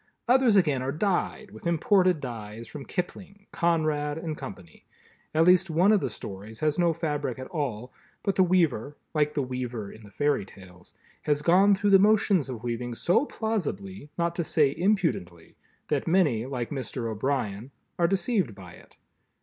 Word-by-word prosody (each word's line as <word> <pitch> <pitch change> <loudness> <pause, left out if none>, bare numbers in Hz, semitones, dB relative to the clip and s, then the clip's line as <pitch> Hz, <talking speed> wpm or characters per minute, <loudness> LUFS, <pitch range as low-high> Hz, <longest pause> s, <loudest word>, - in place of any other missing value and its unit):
Others 250 -3 +5
again 150 -9 +3
are 130 +1 -2
dyed 195 +4 -1
with - - -7
imported 180 +1 +3
dyes 115 -3 -7
from 140 +2 -9
Kipling, 195 +2 -5
Conrad 155 -3 0
and 160 -1 -4
Company. 100 - -10 0.5
At 160 +1 +3
least 180 +1 +5
one 175 +6 +4
of 215 - +5
the 135 - -2
stories 105 +1 -8
has 155 +1 +1
no 170 -1 +4
fabric 150 -5 -2
at 130 - -6
all, 125 -7 -4 0.3
but 195 - +1
the - - +4
weaver—like 150 -3 0
the 145 - +1
Weaver 125 -5 -4
in 110 - -13
the 105 - -13
Fairy 145 +2 0
Tales—has 95 +10 -6
gone 195 +4 +5
through 200 +1 +1
the 195 - +8
motions 200 -7 +3
of 120 -3 -6
weaving 120 0 -3
so 180 - +2
plausibly, 145 - -4
not 170 -1 0
to 170 - 0
say 150 -3 +2
impudently, 165 - -1 0.3
that - - 0
many, 150 -10 +2
like 125 -3 -4
Mr. 130 -3 -4
O'Brien, 110 -1 -2 0.3
are 170 - +4
deceived 195 - 0
by 95 -3 -11
it. - - -17
150 Hz, 165 wpm, -27 LUFS, 120-180 Hz, 0.5 s, the